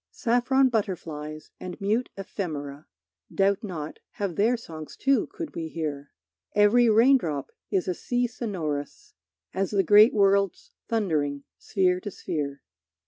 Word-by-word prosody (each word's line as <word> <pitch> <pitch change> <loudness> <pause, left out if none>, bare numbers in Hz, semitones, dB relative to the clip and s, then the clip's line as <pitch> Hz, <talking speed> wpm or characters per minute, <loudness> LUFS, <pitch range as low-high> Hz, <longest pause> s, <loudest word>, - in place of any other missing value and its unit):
Saffron 255 +2 +2
butterflies 160 -9 -4
and 180 -1 -7
mute 215 +5 0
ephemera, 155 -7 -5 0.4
Doubt 195 +1 +2
not, 160 -7 -6
have 195 -5 -3
their 230 +5 +3
songs 160 -8 -9
too, 275 -4 +2
could 330 -4 -7
we 165 -1 -3
hear. 150 -3 -4 0.5
Every 220 +4 +5
raindrop 220 - +3 0.2
is 190 -2 0
a 180 - +1
sea 245 +7 -1
sonorous 170 - -4 0.4
As 195 0 0
the 200 -2 +2
great 210 +5 +7
worlds 200 -2 +2 0.2
thundering 150 -11 0 0.2
sphere 185 -3 +1
to 205 - -6
sphere. 145 -7 -4
195 Hz, 130 wpm, -26 LUFS, 155-225 Hz, 0.5 s, great